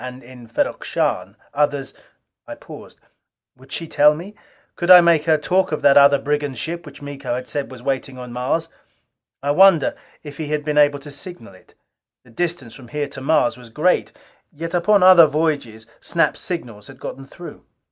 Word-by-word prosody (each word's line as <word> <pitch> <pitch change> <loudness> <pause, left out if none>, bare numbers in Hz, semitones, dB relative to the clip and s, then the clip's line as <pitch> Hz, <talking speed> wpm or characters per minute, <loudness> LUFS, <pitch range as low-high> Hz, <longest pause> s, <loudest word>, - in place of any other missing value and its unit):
And 125 0 -8
in 125 -1 -14
Ferrok 115 - -2
Shahn, - - -2 0.2
others 145 -2 -1 0.3
" - - -56
I - - -7
paused. - - -13 0.6
Would 130 +1 -20
she 165 - -4
tell 150 0 +4
me? 180 +6 -9 0.4
Could 175 - -4
I 180 -1 +11
make 170 -3 +3
her 160 -1 +3
talk 180 +5 0
of 155 - -3
that 140 -1 +6
other 140 0 +6
brigand 145 -2 -2
ship 170 +6 -5
which - - -13
Miko 140 -3 -5
had 125 0 -6
said 145 -2 -4
was 130 -2 -12
waiting 135 -1 -3
on 125 -1 -9
Mars? 130 +7 -2 0.8
I 145 - +1
wondered 180 -1 +5 0.3
if 145 -2 -10
he 155 - -5
had 150 0 -3
been 150 -1 +1
able 145 -1 +4
to 145 +1 -11
signal 145 - -9
it. 95 - -21 0.5
The 125 - -20
distance 160 -4 -3
from 120 +1 -13
here 145 +3 -3
to 140 - -9
Mars 135 -4 +1
was 120 -2 -14
great; 155 +10 0 0.4
yet 165 +2 -7
upon 180 +3 +3
other 185 -3 +8
voyages 145 -8 -2
Snap's 165 - 0
signals 120 - -6
had 135 - -13
gotten 135 - -8
through. 175 +4 -12
145 Hz, 190 wpm, -20 LUFS, 130-165 Hz, 0.8 s, I